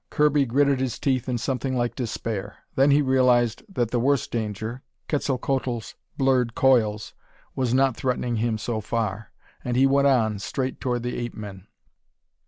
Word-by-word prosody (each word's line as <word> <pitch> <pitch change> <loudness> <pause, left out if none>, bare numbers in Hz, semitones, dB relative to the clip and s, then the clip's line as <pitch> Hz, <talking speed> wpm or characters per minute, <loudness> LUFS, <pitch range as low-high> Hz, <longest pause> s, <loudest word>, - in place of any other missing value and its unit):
Kirby 150 -2 +3
gritted 140 +2 +2
his 130 -2 -2
teeth 130 -2 0
in 125 - 0
something 130 +2 -2
like 120 -1 0
despair. 110 -4 -4 0.2
Then 135 +2 +4
he 145 +1 +4
realized 125 -3 +3
that 120 - -1
the 120 - +1
worst 140 +2 +1
danger 110 +2 -4 0.3
Quetzalcoatl's 130 -4 -1 0.2
blurred 130 -3 +2
coils 110 -6 +2 0.4
was 130 -3 0
not 130 -1 +3
threatening 125 -2 -1
him 110 0 0
so 110 0 -3
far. 110 -1 -3 0.3
And 125 0 -1
he 135 - +5
went 140 +1 +4
on, 110 -6 +2
straight 130 +6 -3
toward 125 -2 -1
the 125 0 -3
ape 120 -1 -5
men. 100 -2 -9
125 Hz, 160 wpm, -24 LUFS, 115-135 Hz, 0.4 s, he